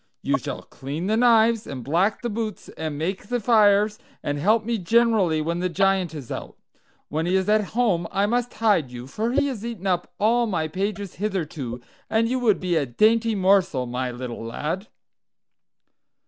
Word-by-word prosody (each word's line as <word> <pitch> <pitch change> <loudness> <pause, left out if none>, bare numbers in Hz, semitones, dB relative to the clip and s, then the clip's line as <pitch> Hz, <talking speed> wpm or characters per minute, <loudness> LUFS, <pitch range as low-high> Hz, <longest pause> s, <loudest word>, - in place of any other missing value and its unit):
You - - +1
shall - - -6
clean 145 +6 -6
the 215 +3 +1
knives, 230 -1 +4
and 130 -3 -6
black 180 - +1
the 240 - -1
boots, 215 -1 -4
and 155 -2 -5
make 185 +6 -3
the 245 +1 -1
fires, 210 -2 +4 0.2
and 145 0 -2
help 215 +7 +2
me 230 -1 -1
generally 200 -5 +3
when 170 +2 -2
the 180 +1 0
Giant 190 -2 +1
is 135 -6 -8
out. - - -6 0.5
When 160 +3 -1
he 180 - +2
is 190 0 +1
at 215 0 +3
home 190 -9 +2
I 200 +1 +2
must 240 +3 -1
hide 205 - +2
you, 120 0 -7
for 220 - -2
he 275 - +2
has 255 -7 -4
eaten 230 -5 -6
up 180 -2 0
all 235 +3 +3
my 165 -6 -1
pages 200 +3 -4
hitherto, 155 - -3 0.3
and 225 +1 +2
you 255 +2 0
would 220 -5 +3
be 180 -2 -1
a 145 -3 0
dainty 225 - +3
morsel, 185 -8 +2
my 125 +1 -3
little 120 -1 -6
lad." 155 - -4
195 Hz, 185 wpm, -24 LUFS, 160-220 Hz, 0.5 s, knives